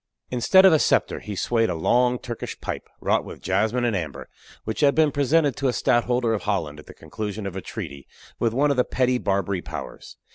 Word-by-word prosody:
Instead 190 +10 +5
of 190 - +7
a 155 - +4
scepter, - - +1
he 105 - -7
swayed 115 +2 +1
a 90 - -1
long 125 +9 +2
Turkish 120 -1 -7
pipe, - - -6
wrought - - +1
with - - -10
jasmine 110 +6 0
and 115 -3 +1
amber, 80 -6 -5 0.3
which 110 - -4
had 140 -2 +4
been 155 -2 +4
presented 145 0 +2
to 140 - -1
a 125 - +1
stadtholder 120 -1 +1
of 105 - -2
Holland 80 -8 -2
at - - -14
the - - -12
conclusion 105 -1 -6
of 95 -2 -5
a 95 - -4
treaty 70 -5 -8 0.3
with 115 - +1
one 140 +5 +2
of 140 - -1
the 125 - +4
petty 125 0 0
Barbary 100 -2 -1
powers. - - -8
120 Hz, 215 wpm, -24 LUFS, 100-130 Hz, 0.3 s, of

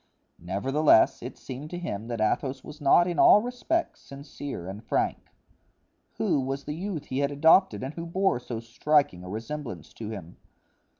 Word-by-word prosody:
Nevertheless, 120 - +3
it 125 - -7
seemed 135 +3 -8
to 175 - -5
him 115 -11 -5
that 120 -2 -4
Athos 130 +5 0
was 150 +1 -11
not 145 +5 +5
in 175 - -2
all - - +8
respects 300 +8 -2
sincere 140 - -8
and 100 +4 -7
frank. - - -1 0.9
Who - - +1
was 135 +1 -3
the 150 - -4
youth 170 -2 -4
he 130 -1 -3
had 140 0 +1
adopted 160 +4 +4
and 135 +3 -4
who 170 +1 -6
bore 190 -5 +1
so 120 -2 -6
striking 115 -4 +1
a 90 - -8
resemblance 115 - -6
to 110 -2 -7
him? 95 -6 -8
140 Hz, 170 wpm, -27 LUFS, 115-160 Hz, 0.9 s, all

